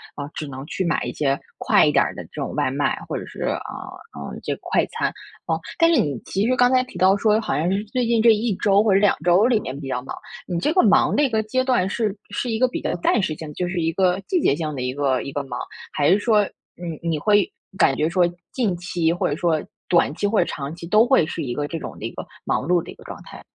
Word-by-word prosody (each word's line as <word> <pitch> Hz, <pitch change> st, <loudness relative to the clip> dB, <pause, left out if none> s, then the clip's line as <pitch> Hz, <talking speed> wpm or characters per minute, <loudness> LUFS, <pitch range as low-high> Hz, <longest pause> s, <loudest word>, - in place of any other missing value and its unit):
啊， 145 Hz, -, -5 dB
只 155 Hz, -, -5 dB
能 135 Hz, 0 st, -7 dB
去 185 Hz, -, -3 dB
买 170 Hz, -3 st, 0 dB
一 -, -, -4 dB
些 140 Hz, -2 st, 0 dB, 0.2 s
快 -, -, +4 dB
一 -, -, +3 dB
点 -, -, +4 dB
儿 -, -, -4 dB
的 -, -, -6 dB
这 -, -, -6 dB
种 -, -, -3 dB
外 -, -, +1 dB
卖， -, -, 0 dB
或 -, -, -4 dB
者 -, -, -4 dB
是， -, -, -10 dB
啊， -, -, -1 dB, 0.5 s
呃， 70 Hz, 0 st, -7 dB
这 -, -, -2 dB
个 -, -, -19 dB
快 -, -, +2 dB
餐， -, -, -1 dB, 0.4 s
啊。 165 Hz, -, +1 dB, 0.2 s
但 335 Hz, 0 st, +5 dB
是 -, -, +4 dB
你 140 Hz, -5 st, -2 dB
其 200 Hz, +3 st, 0 dB
实 255 Hz, -, +2 dB
刚 245 Hz, 0 st, +4 dB
才 255 Hz, 0 st, +4 dB
提 250 Hz, -8 st, -11 dB
到 185 Hz, +2 st, +5 dB
说 215 Hz, +1 st, +3 dB
好 225 Hz, -, -2 dB
像 165 Hz, +4 st, 0 dB
是 200 Hz, +2 st, 0 dB
最 245 Hz, +3 st, -1 dB
近 230 Hz, -1 st, +2 dB
这 230 Hz, +1 st, +7 dB
1 215 Hz, -1 st, 0 dB
周 200 Hz, +2 st, +3 dB
或 215 Hz, -, +2 dB
者 195 Hz, -, +5 dB
2 205 Hz, 0 st, +4 dB
周 180 Hz, +5 st, +5 dB
里 240 Hz, -3 st, +3 dB
面 135 Hz, -7 st, -6 dB
比 140 Hz, -, -7 dB
较 125 Hz, -2 st, -2 dB
忙， 130 Hz, -, -7 dB, 0.3 s
你 175 Hz, -2 st, -2 dB
这 300 Hz, -, +1 dB
个 365 Hz, -, +5 dB
忙 205 Hz, -, +4 dB
的 295 Hz, -, +3 dB
一 275 Hz, -, +2 dB
个 220 Hz, -2 st, +1 dB
阶 255 Hz, +4 st, 0 dB
段 250 Hz, -8 st, +2 dB
是 210 Hz, -1 st, -1 dB, 0.2 s
是 245 Hz, -, -2 dB
一 225 Hz, -, 0 dB
个 255 Hz, -, +4 dB
比 250 Hz, -, -5 dB
较 -, -, -1 dB
暂 210 Hz, +5 st, +2 dB
时 160 Hz, -, -1 dB
性 160 Hz, -, -8 dB
的， 150 Hz, -, -9 dB
就 180 Hz, +4 st, -2 dB
是 175 Hz, 0 st, -2 dB
一 165 Hz, 0 st, +1 dB
个 185 Hz, 0 st, +2 dB
季 360 Hz, -3 st, +1 dB
节 140 Hz, -, +3 dB
性 155 Hz, -1 st, -3 dB
的 130 Hz, -, -4 dB
一 125 Hz, 0 st, -2 dB
个 135 Hz, -2 st, 0 dB
一 140 Hz, -, -6 dB
个 145 Hz, 0 st, -3 dB
忙？ 125 Hz, -3 st, -6 dB, 0.3 s
还 145 Hz, -1 st, +2 dB
是 195 Hz, -, +5 dB
说， 210 Hz, -1 st, +3 dB, 0.3 s
你 170 Hz, -3 st, -6 dB
你 165 Hz, -2 st, +1 dB
会 205 Hz, +3 st, +3 dB, 0.3 s
感 135 Hz, -, +4 dB
觉 155 Hz, +3 st, +1 dB
说， 175 Hz, +1 st, +3 dB, 0.3 s
近 220 Hz, -8 st, 0 dB
期 170 Hz, -2 st, 0 dB
或 175 Hz, -, -1 dB
者 145 Hz, -, -1 dB
说 160 Hz, -1 st, +1 dB, 0.3 s
短 170 Hz, -5 st, +3 dB
期 205 Hz, -, -2 dB
或 210 Hz, +1 st, +2 dB
者 175 Hz, -, +3 dB
长 140 Hz, -1 st, -5 dB
期 170 Hz, 0 st, -9 dB
都 215 Hz, +5 st, +5 dB
会 260 Hz, -, +4 dB
是 165 Hz, -, -5 dB
一 125 Hz, -3 st, -3 dB
个 145 Hz, +3 st, -2 dB
这 165 Hz, -, -4 dB
种 -, -, -8 dB
的 -, -, -6 dB
一 -, -, -4 dB
个 -, -, -7 dB, 0.2 s
忙 -, -, 0 dB
碌 175 Hz, 0 st, +3 dB
的 -, -, -12 dB
一 -, -, -13 dB
个 -, -, -16 dB
状 -, -, -9 dB
态？ -, -, -12 dB
180 Hz, 305 characters per minute, -22 LUFS, 155-220 Hz, 0.5 s, 这